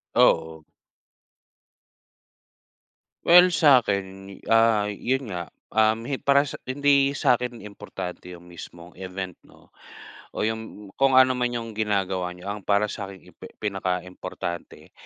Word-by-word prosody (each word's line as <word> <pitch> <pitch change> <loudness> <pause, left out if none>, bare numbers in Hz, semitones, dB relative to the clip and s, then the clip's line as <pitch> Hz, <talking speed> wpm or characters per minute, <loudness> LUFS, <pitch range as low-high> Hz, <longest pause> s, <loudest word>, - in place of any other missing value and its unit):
Oo. 80 -1 +3 2.6
Well, 180 +1 +8
sa'kin, 125 - +3 0.5
ah, 115 -2 +4 0.2
yun 135 +1 +1
nga, 85 -1 -3 0.3
um, 110 +1 +2
hi 135 0 -2
para 140 +1 +4
sa - - -7
hindi 140 0 +2
sa'kin 120 -3 0
importante 95 -3 -8
yung 85 0 -13
mismong 85 0 -12
event 95 -1 -6
'no, - - -21 0.7
o - - -1
yung 110 0 -4 0.4
kung 135 -1 +4
ano 130 0 +7
man 120 0 -1
yung 115 -1 -5
ginagawa 100 -4 -1
niyo. 90 +2 -13
Ang 105 -2 -8
para 105 +1 +2
sa'kin, 100 -3 -8
impe - - -12 0.2
pinakaimportante 90 -3 -5
105 Hz, 120 wpm, -24 LUFS, 95-130 Hz, 2.6 s, Well